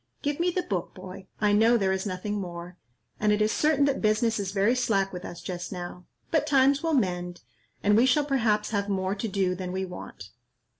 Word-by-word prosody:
Give 290 +1 -1
me 350 +1 +2
the 360 +1 -1
book, 185 - -3
boy, 190 +1 -10
I 210 -1 +3
know 225 +3 +5
there 195 -3 +1
is 190 +2 -1
nothing 200 +2 -3
more, 175 -1 -7 0.4
and 210 0 +2
it 210 - +2
is 215 0 +2
certain 300 -2 +3
that 280 -1 0
business 220 +1 +2
is 195 -2 -2
very 200 +4 +2
slack 220 -6 +1
with 180 0 -6
us 170 0 -8
just 180 -1 -5
now; 180 -1 -7 0.2
but 300 -2 +2
times 275 0 +4
will 325 -2 +1
mend, 180 -6 -1 0.4
and 205 0 +4
we 235 +4 +5
shall 290 +3 +3
perhaps 220 -7 +1
have 200 -1 -1
more 190 -1 0
to 210 +3 -3
do 195 -3 0
than 180 0 -5
we 190 +1 -2
want. 180 -1 -9
205 Hz, 215 wpm, -27 LUFS, 185-245 Hz, 0.4 s, know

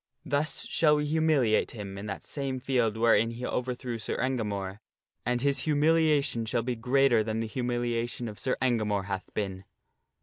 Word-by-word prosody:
Thus 145 +1 -1
shall 150 -2 +3
we 150 0 0
humiliate 150 -7 +2
him 100 -2 -6
in 100 +2 -6
that 100 - -6
same 135 -2 -3
field 125 -4 +1
wherein 115 -1 +4
he 120 +2 -5
overthrew 125 -2 -3
Sir 110 - -3
Engamore, 105 -6 -2 0.5
and 120 0 +1
his 140 -1 +3
humiliation 150 -5 +2
shall 115 0 0
be 125 0 -2
greater 125 0 +3
than 110 0 -2
the 115 - -1
humiliation 120 0 -2
of 105 -2 -8
Sir 130 - 0
Engamore 105 -6 +1
hath 95 -1 -5
been." 95 -2 -3
120 Hz, 165 wpm, -29 LUFS, 110-135 Hz, 0.5 s, wherein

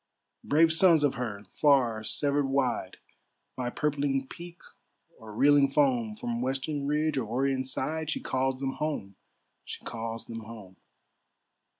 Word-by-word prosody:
Brave 160 +2 +4
sons 165 -3 +5
of 145 - +3
her, 110 -5 -5
far 125 -7 +3
severed 145 +4 0
wide 130 -8 -1 0.6
By 125 -1 -2
purpling 140 -1 -1
peak 175 +3 -10 0.6
or 110 -1 -11
reeling 140 +5 +4
foam; 125 -6 +1
From 120 +2 -3
western 135 +2 -2
ridge 150 0 +1
or 115 - -3
orient 130 +3 0
side, 155 +4 -3
She - - -1
calls 130 0 -1
them 135 -1 -2
home, 145 -11 -3 0.5
she - - -9
calls 115 0 -5
them 115 0 -7
home. 105 -4 -11
135 Hz, 135 wpm, -28 LUFS, 115-145 Hz, 0.6 s, sons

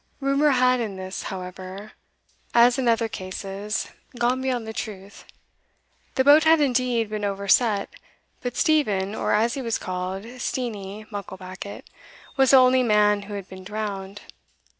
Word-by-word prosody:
Rumour 275 +2 +2
had 255 -2 +3
in 215 -4 -3
this, 190 0 -6
however, 185 +2 -7 0.6
as 240 +2 +6
in 255 - 0
other 230 0 +2
cases, 195 +1 -5 0.3
gone 245 +2 +1
beyond 255 -3 -1
the 220 - -6
truth. 200 -3 -7 0.9
The 260 - +3
boat 290 +3 +7
had 320 0 +5
indeed 250 -4 +1
been 210 -1 -3
overset; 200 +1 +2 0.5
but 245 -1 -4
Stephen, 210 - +2
or, - - -1
as 225 +3 +2
he 275 - -3
was 230 -3 -1
called, 185 +1 -4 0.2
Steenie 215 -5 -4
Mucklebackit, 190 -1 -7 0.5
was 270 -1 +4
the 270 - +8
only 255 0 +5
man 210 -3 +3
who 205 +1 -7
had 195 -2 -6
been 190 -1 -11
drowned. 205 -1 -5
215 Hz, 145 wpm, -24 LUFS, 195-250 Hz, 0.9 s, the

